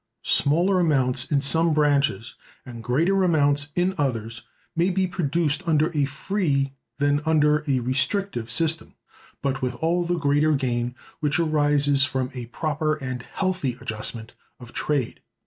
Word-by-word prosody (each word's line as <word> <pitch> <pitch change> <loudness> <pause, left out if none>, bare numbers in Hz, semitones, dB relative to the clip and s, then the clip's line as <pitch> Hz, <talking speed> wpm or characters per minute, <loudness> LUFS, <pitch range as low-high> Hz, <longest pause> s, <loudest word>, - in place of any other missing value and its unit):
Smaller 175 +6 +3
amounts 130 -6 +2
in 140 -1 0
some 160 +3 +3
branches, 140 -7 +1 0.3
and 120 -3 -9
greater 170 +11 +1
amounts 145 -4 +2
in 180 +2 +1
others, 115 -4 -2 0.3
may 170 +3 +2
be 190 0 0
produced 170 -4 -1
under 155 0 +2
a 145 -2 +1
free 140 -2 -1 0.2
than 145 +1 +1
under 150 -1 +2
a 130 -3 +1
restrictive 130 - -1
system, 160 +7 +1 0.5
but 135 -1 -1
with 125 -1 -2
all 170 +7 0
the 175 0 -1
greater 150 0 +2
gain 125 -3 -1 0.2
which 150 -1 0
arises 145 -3 +3
from 130 -2 -2
a 125 -3 -7
proper 155 +4 -2
and 130 -4 -5
healthy 180 -5 -3
adjustment 110 +1 -4 0.3
of 120 -1 -13
trade. 140 -6 -2
145 Hz, 145 wpm, -24 LUFS, 130-165 Hz, 0.5 s, Smaller